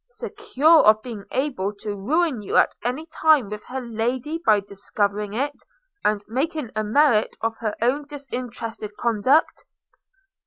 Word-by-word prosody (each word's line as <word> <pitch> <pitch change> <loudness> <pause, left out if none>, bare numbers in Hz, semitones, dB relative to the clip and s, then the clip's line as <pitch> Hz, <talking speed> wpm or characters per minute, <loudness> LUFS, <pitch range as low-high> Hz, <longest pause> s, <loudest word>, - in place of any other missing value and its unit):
secure 370 - +2
of 215 0 +6
being 225 -5 -7
able 255 -8 -1
to 210 0 -6
ruin 270 - 0
you 200 - -1
at - - +4
any 255 +7 -2
time 315 -6 +3
with 210 0 -6
her 265 +1 -5
Lady 245 +6 -2
by 215 -7 +5
discovering 200 +1 -2
it, 285 +4 -1 0.5
and 210 -1 0
making 275 +2 -2
a 215 - 0
merit 225 0 +3
of 225 0 -1
her 215 -2 -3
own 270 +5 +1
disinterested 245 -6 -6
conduct.' 240 +7 +2
240 Hz, 145 wpm, -23 LUFS, 210-290 Hz, 0.5 s, of